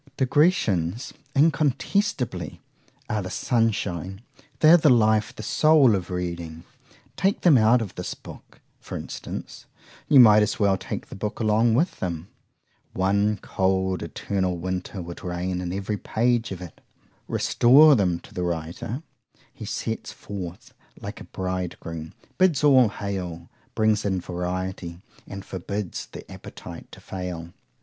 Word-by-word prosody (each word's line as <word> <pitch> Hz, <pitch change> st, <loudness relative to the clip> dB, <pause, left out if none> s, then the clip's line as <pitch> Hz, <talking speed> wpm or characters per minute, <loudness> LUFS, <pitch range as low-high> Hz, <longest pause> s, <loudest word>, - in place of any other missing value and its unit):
Digressions, 125 Hz, -, +1 dB, 0.2 s
incontestably, 140 Hz, -, +1 dB, 0.5 s
are 105 Hz, -, -1 dB
the 90 Hz, -, -5 dB
sunshine;——they 105 Hz, -, 0 dB
are -, -, +10 dB
the 155 Hz, -2 st, +4 dB
life, 110 Hz, -3 st, +3 dB
the 110 Hz, -, -7 dB
soul 155 Hz, -5 st, +5 dB
of 95 Hz, -3 st, -2 dB
reading!—take 90 Hz, -, -4 dB
them 170 Hz, -5 st, +6 dB
out 115 Hz, +1 st, +5 dB
of 100 Hz, -3 st, -8 dB
this 90 Hz, -, -5 dB
book, -, -, -14 dB, 0.2 s
for -, -, -7 dB
instance,—you 145 Hz, -3 st, -3 dB
might 110 Hz, -3 st, +8 dB
as 105 Hz, -, 0 dB
well 100 Hz, -2 st, +3 dB
take -, -, -6 dB
the -, -, -8 dB
book 105 Hz, +2 st, -4 dB
along 110 Hz, +1 st, +3 dB
with 165 Hz, +9 st, 0 dB
them;—one 95 Hz, +3 st, -3 dB
cold 95 Hz, -1 st, 0 dB
eternal 95 Hz, -3 st, -2 dB
winter 90 Hz, +1 st, -4 dB
would 85 Hz, 0 st, -9 dB
reign 90 Hz, +1 st, -2 dB
in 90 Hz, -1 st, -4 dB
every 100 Hz, +2 st, -2 dB
page 120 Hz, +2 st, 0 dB
of 90 Hz, -1 st, -6 dB
it; 85 Hz, -, -12 dB, 0.5 s
restore 145 Hz, +6 st, +6 dB
them 90 Hz, -6 st, +1 dB
to -, -, -16 dB
the 90 Hz, -, -3 dB
writer;—he 85 Hz, -, -6 dB
steps -, -, -4 dB
forth 95 Hz, -3 st, -8 dB, 0.3 s
like -, -, -7 dB
a -, -, -9 dB
bridegroom,—bids 90 Hz, -, -2 dB
All 130 Hz, -6 st, +6 dB
hail; 90 Hz, -5 st, -5 dB, 0.2 s
brings 110 Hz, -1 st, +2 dB
in 95 Hz, -2 st, 0 dB
variety, 90 Hz, -1 st, -4 dB, 0.3 s
and 95 Hz, 0 st, -8 dB
forbids 100 Hz, +1 st, -5 dB
the -, -, -10 dB
appetite -, -, -10 dB
to -, -, -11 dB
fail. 90 Hz, -3 st, -6 dB
100 Hz, 125 wpm, -25 LUFS, 90-120 Hz, 0.5 s, are